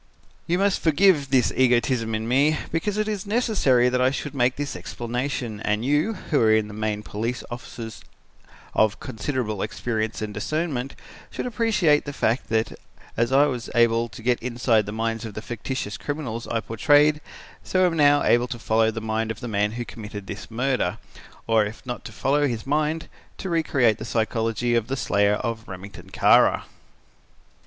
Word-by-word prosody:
"You 175 - +2
must 195 0 +2
forgive 160 -3 +4
this 130 -3 +3
egotism 120 -2 +2
in 110 +1 -3
me 140 +5 +3
because 200 +5 -1
it 215 0 0
is 205 -2 -3
necessary 205 - +3
that 125 0 +1
I 130 - +4
should 145 +2 -4
make 125 -2 +2
this 145 -1 -4
explanation 120 -2 -4
and 105 +2 -1
you, 150 +10 +2
who 160 -5 0
are 110 -1 +5
in 110 -1 +3
the 105 - -9
main 105 0 -2
police 115 +5 -3
officers 115 -1 -8 0.7
of 110 -1 +2
considerable 115 -3 -3
experience 110 0 -2
and 105 -1 -4
discernment, 145 - -2 0.3
should - - -5
appreciate 210 -10 +2
the 145 - -5
fact 115 +4 0
that 110 0 -1 0.4
as 115 +2 +1
I 140 +2 +6
was 125 -5 -3
able 115 0 +3
to 110 +1 -11
get 120 0 +1
inside 120 -3 +1
the - - -4
minds 115 +1 -2
of 110 -3 -7
the - - -3
fictitious 120 -2 -4
criminals 135 -6 -4
I 115 - -1
portrayed, 145 +7 +3 0.4
so 185 0 +2
am 175 - +2
I - - -3
now 145 -1 +5
able 120 +1 +3
to 120 - -5
follow 110 0 +2
the 110 0 -4
mind 110 0 -1
of 110 -1 -4
the 120 - -6
man 105 -1 0
who 120 +1 -4
committed 105 -3 -8
this 100 +1 -8
murder, 120 -4 0 0.5
or 110 -1 +3
if 105 +5 -7
not 125 -1 -5
to - - -7
follow 145 +2 +1
his 115 -4 -4
mind, 155 +3 0 0.3
to 190 - -5
recreate 135 -9 +2
the 110 - -6
psychology 115 +1 0
of 115 -2 +1
the 135 +1 -2
slayer 100 -3 +2
of 115 +1 -4
Remington 95 -1 -10
Kara. - - +4
120 Hz, 180 wpm, -24 LUFS, 110-145 Hz, 0.7 s, I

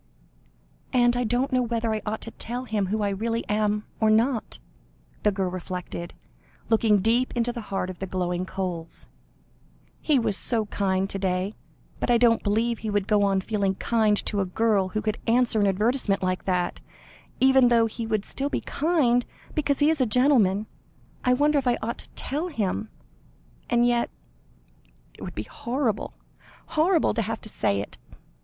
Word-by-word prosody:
"And 245 -2 +3
I 245 - +1
don't 245 +5 0
know 255 -1 +3
whether 230 -2 -1
I 215 - -2
ought 220 +1 -2
to 230 - -7
tell 245 +3 -5
him 215 -5 -1
who 210 +2 -1
I 205 - +1
really 230 +4 -2
am, 210 0 0
or 220 - +3
not," 225 +2 +1 0.6
the 210 - +3
girl 190 -2 -2
reflected, 180 -1 -6 0.5
looking 220 -3 +3
deep 235 +5 +2
into 240 0 0
the 235 - -5
heart 190 -1 -2
of 180 - -13
the 195 - -4
glowing 180 -1 -2
coals. 175 -4 -5 0.9
"He 300 -3 +2
was 225 -5 +1
so 225 +1 +3
kind 195 -2 0
to 195 - -4
day, 185 +1 -1 0.5
but - - -2
I 240 - +5
don't 230 -1 +4
believe 225 +3 0
he 220 - -4
would 205 -2 0
go 210 -1 +3
on 195 -1 +2
feeling 200 -2 -1
kind 215 0 +2
to 205 -2 0
a - - 0
girl 200 0 +1
who 215 +2 -3
could 215 +1 -1
answer 235 -1 +3
an 205 - +3
advertisement 205 0 +1
like 185 0 -1
that 180 -2 -1 0.6
even 265 -1 +6
though 235 -1 +4
he 225 +1 -4
would 215 -2 -1
still 280 +1 -2
be - - -2
kind, 280 -7 +2 0.3
because 285 -2 0
he 295 +2 +4
is 315 -4 -1
a 255 - +3
gentleman. 220 -5 +3 0.6
I 250 - +4
wonder 290 +3 +3
if 265 - -4
I 245 - +3
ought 235 +2 -3
to - - -11
tell 300 +6 -3
him? 220 - -2 0.8
And 240 0 +3
yet 240 -1 +2 1.0
it - - -17
would - - -7
be 105 - -3
horrible 235 - -2 0.5
horrible 325 +2 +2
to 230 - 0
have 225 +1 -3
to 215 - -8
say 100 - 0
it. - - -10
220 Hz, 180 wpm, -25 LUFS, 195-245 Hz, 1.0 s, even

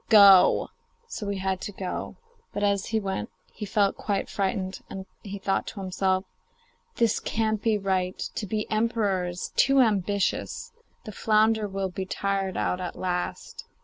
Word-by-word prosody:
Go!' 200 -4 +7 0.4
So 210 - -5
he 200 - -1
had 190 0 -1
to - - -4
go. 190 -2 -5 0.4
But 205 - -2
as 200 -1 +1
he 225 - +1
went, 195 - -3 0.2
he 210 - -6
felt 200 0 +2
quite 200 -2 -2
frightened, 190 -1 -2
and 190 0 -6 0.2
he 200 -1 -6
thought 195 0 -1
to 205 - -6
himself, 190 0 0 0.7
'This 230 -3 +2
can't 220 -1 -1
be 220 -2 +2
right; 190 -2 -1 0.2
to 210 - -4
be 215 +2 -1
emperor 215 -4 +1
is 175 +1 -5
too 275 0 +5
ambitious; 205 -4 +1 0.3
the 215 - -6
flounder 215 +1 +2
will 195 -1 -2
be 190 +1 -5
tired 195 -1 -1
out 180 - 0
at 180 - -4
last. 180 -1 -3
200 Hz, 160 wpm, -26 LUFS, 190-215 Hz, 0.7 s, Go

